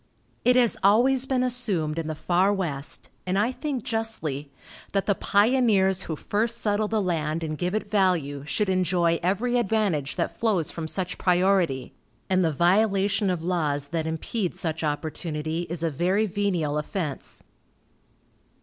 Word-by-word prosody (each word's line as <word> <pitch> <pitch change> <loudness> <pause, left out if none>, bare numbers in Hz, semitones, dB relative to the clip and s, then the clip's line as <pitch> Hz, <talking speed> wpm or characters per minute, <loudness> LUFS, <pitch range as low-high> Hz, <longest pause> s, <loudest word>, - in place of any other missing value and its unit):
It 250 - +4
has 245 -3 +3
always 250 +6 +4
been 255 -1 +1
assumed 195 -11 0
in 160 - -4
the 155 - -3
far 180 +5 +2
West, 155 -8 -3 0.2
and 185 +1 0
I 215 +5 +2
think 270 -3 -4
justly, 165 - -3 0.4
that 195 -1 +1
the 205 - +3
pioneers 200 -3 +3
who 160 - -3
first 225 +8 -1
settle 210 -1 0
the 220 0 0
land 165 -4 -1
and 155 -1 -3
give 180 +5 -2
it 215 - -2
value 180 -9 +1
should 195 +8 -1
enjoy 175 -2 +2
every 225 +8 +1
advantage 200 - 0
that - - -2
flows 200 -9 0
from 165 -2 -5
such 180 +2 -3
priority, 180 -7 +2 0.4
and 185 0 +3
the 165 - +2
violation 195 +4 +2
of 175 -3 -2
laws 150 -5 0
that 160 -1 -2
impede 175 +4 -2
such 160 -1 -2
opportunity 155 +2 -2
is 170 -1 -3
a 165 - +1
very 185 +8 +1
venial 180 -7 -1
offense. 150 -3 -5
185 Hz, 155 wpm, -25 LUFS, 160-210 Hz, 0.4 s, It